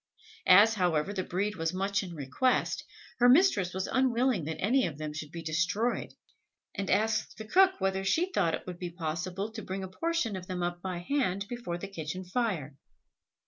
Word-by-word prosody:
As, 205 +5 +8
however, 180 -2 +1
the 190 - -1
breed 195 +3 -2
was 165 +2 -1
much 195 +1 0
in 175 -3 -7
request, 150 - 0 0.4
her 245 0 +6
mistress 250 - +5
was 190 +1 -2
unwilling 250 - +1
that 160 0 -4
any 250 +5 +2
of 150 -4 -7
them 155 -1 -5
should 150 0 -6
be 170 -1 -7
destroyed, 180 +9 -1 0.6
and 200 -1 -3
asked 215 +2 +1
the 220 - -7
cook 375 - +5
whether 195 0 0
she 330 - +1
thought 170 - +2
it - - -10
would 180 -1 -7
be 180 - -4
possible 180 +4 -4
to 220 0 -7
bring 190 0 -5
a - - -4
portion 295 - -1
of 180 -1 -7
them 180 -1 -3
up 175 0 -3
by 185 -1 -3
hand 205 -9 0
before 235 -8 -4
the 195 - -6
kitchen 185 -1 -5
fire. 180 - -2
190 Hz, 190 wpm, -30 LUFS, 175-225 Hz, 0.6 s, As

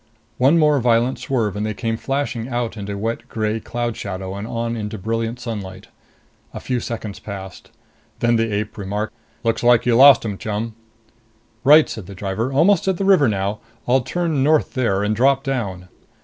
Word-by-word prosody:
One 135 +6 +5
more 150 -3 +4
violent 120 +1 +2
swerve 115 -8 -1
and 105 - -2
they 110 -1 -2
came 115 0 -2
flashing 135 -2 -2
out 120 -3 -2
into 100 -1 -5
wet 115 +3 -4
gray 110 0 -1
cloud 120 +1 -3
shadow 95 -1 -5
and 100 +2 -6
on 115 0 -2
into 110 -1 -4
brilliant 115 +4 -2
sunlight. 100 -6 -7 0.7
A - - -4
few 125 -1 -2
seconds 110 -3 -6
passed. 95 -3 -9 0.5
Then 120 0 +2
the 115 -1 +1
ape 105 +1 -3
remarked, 105 +2 -3 0.3
"Looks 115 0 0
like 120 -1 +4
you 120 -2 +3
lost 135 +2 +8
them, 105 -4 -4
chum." 110 +1 -3 0.9
"Right," 150 +3 +7
said 105 -5 -7
the 100 - -9
driver. 100 +6 -2
"Almost 170 +7 +3
at 190 -2 +1
the 195 - -1
river 190 -8 +5
now. 100 0 -1 0.3
I'll 130 +2 +4
turn 160 +3 -1
north 155 +2 +2
there 110 -7 +1
and 105 +1 0
drop 135 +4 +3
down." 100 -10 -3
115 Hz, 180 wpm, -21 LUFS, 105-130 Hz, 0.9 s, lost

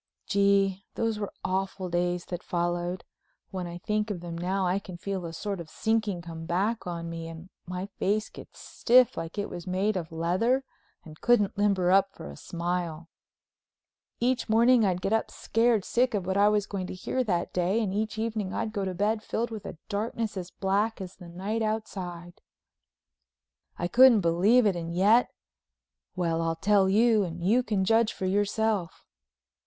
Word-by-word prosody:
Gee, 200 -1 +2
those 225 -2 -1
were 205 - -3
awful 190 0 -2
days 175 0 -1
that 175 -1 -5
followed! 175 +1 -2 0.5
When 185 -2 -4
I 170 0 -7
think 210 +3 -1
of 200 -4 -3
them 170 -1 -6
now 185 +3 -1
I 180 +2 +1
can 185 -3 -9
feel 190 0 -4
a - - -6
sort 195 +3 -4
of 165 -2 -8
sinking 215 -5 -1
come 165 -1 -8
back 200 +5 0
on 170 -1 -4
me 165 0 -6
and 165 +2 -10 0.2
my 180 +1 -4
face 210 +2 +1
gets - - -13
stiff 250 0 +3
like 165 +4 -6
it 205 - -1
was 175 -1 -8
made 195 +3 0
of 170 -2 -4
leather 185 +11 +1 0.4
and 155 -1 -13
couldn't 210 -5 +3
limber 200 -3 +2
up 195 0 +3
for 70 - -8
a - - -10
smile. 170 - -4 1.1
Each 245 0 0
morning 235 +2 +5
I'd 180 -3 +1
get 195 - +1
up 225 - +1
scared 225 -3 +1
sick 250 -1 +1
of 195 -3 -2
what 190 +1 -1
I 205 +1 +5
was 210 -1 +1
going 190 -3 -4
to - - -6
hear 255 +7 -1
that 175 -7 -1
day, 180 +5 +1
and 205 -4 -1
each 215 +1 -2
evening 220 -3 -2
I'd 220 - -2
go 200 -3 -2
to 185 -1 -3
bed 210 +3 +1
filled 230 +1 -2
with 215 -3 -6
a - - -8
darkness 220 +1 -2
as 180 -2 -5
black 205 +4 0
as 185 -1 -8
the 175 -3 -11
night 200 +6 -3
outside. 185 -5 -4 1.4
I 175 - -1
couldn't 240 +1 +7
believe 190 +9 +4
it 200 -3 +3
and 170 -1 -4
yet—well, 165 - -1
I'll 165 0 0
tell 195 +2 +3
you 220 +1 +4
and 170 -1 -5
you 225 +7 +4
can 205 -6 0
judge 225 +1 +3
for 190 - -4
yourself. 205 -1 0
195 Hz, 180 wpm, -28 LUFS, 175-215 Hz, 1.4 s, couldn't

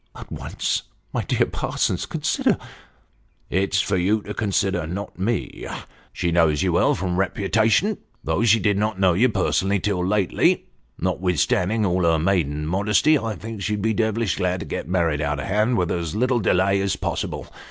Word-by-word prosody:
" - - -38
At - - -11
once! - - -2 0.3
My - - 0
dear - - +1
Parsons, - - -2
consider." - - 0 0.9
"It's 95 +1 +1
for 100 - 0
you 100 +4 +1
to - - -6
consider, 95 -5 0
not 95 +2 -6
me. 115 +5 -2 0.4
She 85 - -1
knows 80 -3 +3
you - - +1
well - - +3
from 90 0 -2
reputation, 110 - +1 0.2
though 80 +5 0
she 115 -1 +5
did 100 -2 +1
not 105 -2 -1
know 95 -2 +4
you 120 +9 +3
personally 100 -2 +1
until 100 -2 0
lately. 95 0 +2 0.3
Notwithstanding 90 +4 +1
all 90 -1 +1
her 85 -1 +3
maiden 80 -4 0
modesty, 105 - +3
I 115 -6 -2
think 110 -1 -7
she'd 105 0 -2
be 110 0 +2
devilish 110 -1 0
glad 90 -1 -1
to - - -5
get - - -5
married 85 -5 +1
out 75 0 -1
of 70 - -4
hand 105 - +1
with 90 -2 0
as 85 0 -2
little 125 +2 +2
delay 95 0 +2
as 100 0 0
possible. - - -3
95 Hz, 175 wpm, -23 LUFS, 90-105 Hz, 0.9 s, she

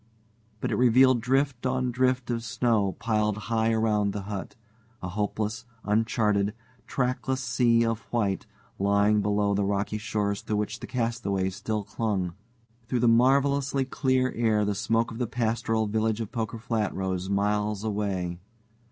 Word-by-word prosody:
But - - -1
it - - 0
revealed 125 0 +5
drift 135 +1 +1
on 130 -1 0
drift 125 0 +1
of 115 -1 -2
snow 115 -4 +1
piled 105 -1 0
high 110 0 0
around 105 -3 +1
the 100 - -4
hut 100 -1 -6 0.4
a 90 - -5
hopeless, 105 +3 -2 0.2
uncharted, 105 -1 +1 0.3
trackless 130 0 -1
sea 115 -1 +3
of 115 -1 0
white 105 -5 0 0.3
lying 100 +1 +3
below 100 0 +1
the 100 0 +1
rocky 100 +2 -1
shores 105 -3 -1
to 105 - -2
which 105 0 -2
the - - -7
castaways 110 -6 -1
still 110 0 -2
clung. 100 -3 -2 0.5
Through 125 -1 0
the 120 - +4
marvelously 135 +3 +3
clear 130 -1 +1
air 110 -2 +2
the 105 - 0
smoke 115 +3 0
of 115 - -7
the 125 - 0
pastoral 115 -1 0
village 110 +1 0
of 110 -3 -4
Poker 115 -2 -3
Flat 110 -2 -2
rose 95 -1 -2
miles 105 +1 0
away. 100 -5 -2
110 Hz, 150 wpm, -27 LUFS, 100-120 Hz, 0.5 s, revealed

